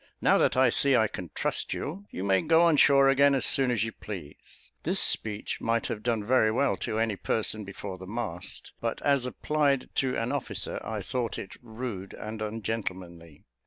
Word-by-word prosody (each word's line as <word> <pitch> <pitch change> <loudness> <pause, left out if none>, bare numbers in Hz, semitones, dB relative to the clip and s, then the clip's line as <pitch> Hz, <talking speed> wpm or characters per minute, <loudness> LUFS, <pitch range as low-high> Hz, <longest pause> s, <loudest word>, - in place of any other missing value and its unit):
Now - - +4
that - - +2
I 130 -2 +5
see 140 +2 +3
I 110 -2 +4
can 90 -4 -7
trust - - -1
you, 190 +8 -5
you 95 - -5
may 95 -1 +3
go 165 +1 +4
on 170 -2 +5
shore 140 -1 +6
again 140 +1 +5
as 135 - +2
soon 135 -3 +3
as 115 -4 +1
you 115 - -2
please." 90 - -10
This - - 0
speech 105 -2 -1
might 115 0 0
have 105 - -3
done 115 -2 0
very 115 -2 +4
well 135 +4 +2
to 110 - -3
any 110 -2 +1
person 110 +2 -1
before 95 -1 -7
the 95 - -9
mast; 105 -5 -6
but - - -2
as 140 -3 +2
applied 140 0 0
to 130 -1 +1
an 115 +1 -1
officer, - - -3
I 110 -1 -4
thought 120 +4 -2
it 95 - -7
rude 110 -5 -6
and 110 0 -7
ungentlemanly. 95 -7 -5
115 Hz, 195 wpm, -28 LUFS, 100-130 Hz, -, shore